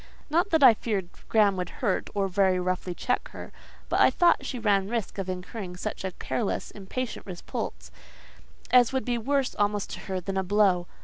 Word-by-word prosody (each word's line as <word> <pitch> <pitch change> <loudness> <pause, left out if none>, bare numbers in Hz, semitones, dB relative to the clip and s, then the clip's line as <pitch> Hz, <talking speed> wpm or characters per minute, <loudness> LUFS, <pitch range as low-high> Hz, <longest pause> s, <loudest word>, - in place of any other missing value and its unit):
Not 345 +6 +2
that 320 -5 +3
I 250 -3 +10
feared 205 -5 -3 0.2
Graham 210 -3 +4
would 180 -1 -3
hurt, 205 -7 -1
or 200 -1 +1
very 190 -1 +2
roughly 180 0 -2
check 250 +8 -1
her; - - -9 0.4
but - - 0
I - - +7
thought 345 -6 +3
she 255 - -4
ran 200 -4 +1
risk 230 -3 -3
of 190 -1 -3
incurring 185 0 -6
such - - -5
a 190 - -1
careless, 220 +2 -3
impatient 220 +5 -5
repulse, 60 - -6 0.8
as 250 0 +6
would 265 -1 -1
be 240 -2 0
worse 275 +3 0
almost 205 0 0
to - - -6
her 190 -1 -4
than 190 +2 -4
a 190 - +1
blow. 190 -2 +2
200 Hz, 190 wpm, -27 LUFS, 185-240 Hz, 0.8 s, I